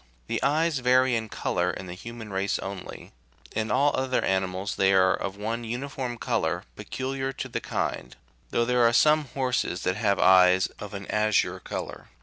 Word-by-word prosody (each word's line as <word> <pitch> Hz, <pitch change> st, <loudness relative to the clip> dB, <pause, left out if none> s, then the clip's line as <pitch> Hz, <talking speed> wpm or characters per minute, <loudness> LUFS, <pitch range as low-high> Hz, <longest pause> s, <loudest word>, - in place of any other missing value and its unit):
The -, -, -2 dB
eyes 155 Hz, +2 st, +2 dB
vary 125 Hz, 0 st, +3 dB
in 110 Hz, -1 st, -3 dB
colour 90 Hz, -2 st, -1 dB
in 95 Hz, -, -5 dB
the 90 Hz, -, -7 dB
human 110 Hz, +2 st, -9 dB
race 95 Hz, +1 st, 0 dB
only; 95 Hz, -1 st, -8 dB, 0.4 s
in 110 Hz, 0 st, -1 dB
all 140 Hz, +3 st, +3 dB
other 130 Hz, -1 st, 0 dB
animals 95 Hz, +1 st, -1 dB
they 95 Hz, 0 st, +3 dB
are 95 Hz, 0 st, +5 dB
of 100 Hz, 0 st, -4 dB
one 115 Hz, +3 st, -3 dB
uniform 125 Hz, +1 st, -4 dB
colour 90 Hz, -8 st, -1 dB
peculiar 135 Hz, +5 st, -4 dB
to -, -, -5 dB
the -, -, -4 dB
kind, -, -, -3 dB, 0.3 s
though 120 Hz, -, +1 dB
there 125 Hz, 0 st, +2 dB
are 115 Hz, 0 st, +4 dB
some 150 Hz, +3 st, +4 dB
horses 125 Hz, -8 st, -1 dB
that 95 Hz, +1 st, 0 dB
have 100 Hz, -3 st, +1 dB
eyes 95 Hz, 0 st, +6 dB
of 105 Hz, -1 st, -7 dB
an 100 Hz, 0 st, -6 dB
azure 105 Hz, -1 st, +1 dB
colour. -, -, -6 dB
110 Hz, 175 wpm, -26 LUFS, 95-130 Hz, 0.4 s, eyes